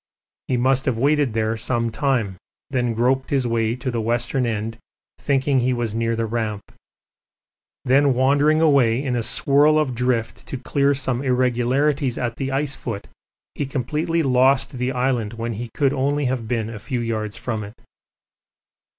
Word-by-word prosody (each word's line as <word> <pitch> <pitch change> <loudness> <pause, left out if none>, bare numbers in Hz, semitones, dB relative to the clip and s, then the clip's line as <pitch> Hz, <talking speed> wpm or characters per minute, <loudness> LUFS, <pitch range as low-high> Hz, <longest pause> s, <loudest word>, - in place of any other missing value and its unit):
He 125 - +1
must 130 +2 +2
have 130 -4 0
waited 140 -1 +2
there 110 0 0
some 115 +1 -1
time, 115 -6 0 0.4
then 120 -3 0
groped 130 +3 +1
his 135 -3 +1
way 115 -1 0
to 130 +1 -4
the 115 -1 -2
western 120 +3 0
end 110 0 -3 0.4
thinking 135 -1 +1
he 125 +1 +1
was 120 -3 -2
near 115 0 0
the 115 0 -1
Ramp. 110 -2 -3 1.2
Then 135 +1 +4
wandering 145 +4 +3
away 135 -5 +3
in 130 -3 -1
a 120 - 0
swirl 145 +6 +3
of 150 -5 +1
drift 120 -2 -1
to 135 - -4
clear 140 +2 +1
some 130 -2 -1
irregularities 130 +1 +1
at 120 -2 -3
the 135 -1 -3
ice 140 +1 -1
foot, 115 -7 -6 0.4
he 145 - -3
completely 150 +6 -1
lost 130 0 +3
the 125 +1 0
island 125 -4 -1
when 115 0 -4
he 115 +3 -6
could 140 -2 +2
only 145 +1 0
have 125 -3 -2
been 115 -1 -2
a 110 - -7
few 125 +2 -3
yards 110 -2 -3
from 110 -3 -3
it. 105 +3 -10
125 Hz, 170 wpm, -22 LUFS, 115-135 Hz, 1.2 s, Then